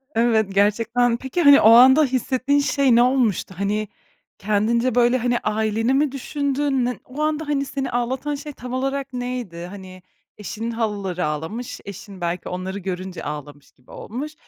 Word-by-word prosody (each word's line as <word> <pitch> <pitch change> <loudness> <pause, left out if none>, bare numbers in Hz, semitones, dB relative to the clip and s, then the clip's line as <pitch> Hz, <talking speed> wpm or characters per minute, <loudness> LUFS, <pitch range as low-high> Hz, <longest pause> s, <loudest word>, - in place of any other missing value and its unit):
Evet, 225 -3 +3
gerçekten. 230 +4 +2
Peki, 265 +8 -3
hani, 285 -2 +7
o 220 - +7
anda 260 +6 +8
hissettiğin 260 +2 0
şey 280 -3 +2
ne 240 - +6
olmuştu? 245 -8 +1
Hani, 210 +2 -1 0.5
kendince, 220 +4 0
böyle, 245 +1 +4
hani, 240 0 0
aileni 220 +3 0
mi 280 0 +2
düşündün, 280 -1 -1
ne 250 - -3
o 275 +4 -7
anda, 305 0 -1
hani, 280 -1 0
seni 270 -1 -4
ağlatan 255 +5 -2
şey 290 +1 -8
tam 250 0 -8
olarak 270 0 -2
neydi? 245 -9 -5
Hani, 185 -2 -11 0.4
eşinin 220 +3 -5
halaları 200 -6 -2
ağlamış, 160 +11 -4
eşin 200 -1 -10
belki 170 +1 -3
onları 185 +2 -4
görünce 185 0 -5
ağlamış 145 -1 -8
gibi 125 - -22
olmuş. 280 +8 -6
235 Hz, 155 wpm, -22 LUFS, 200-265 Hz, 0.5 s, anda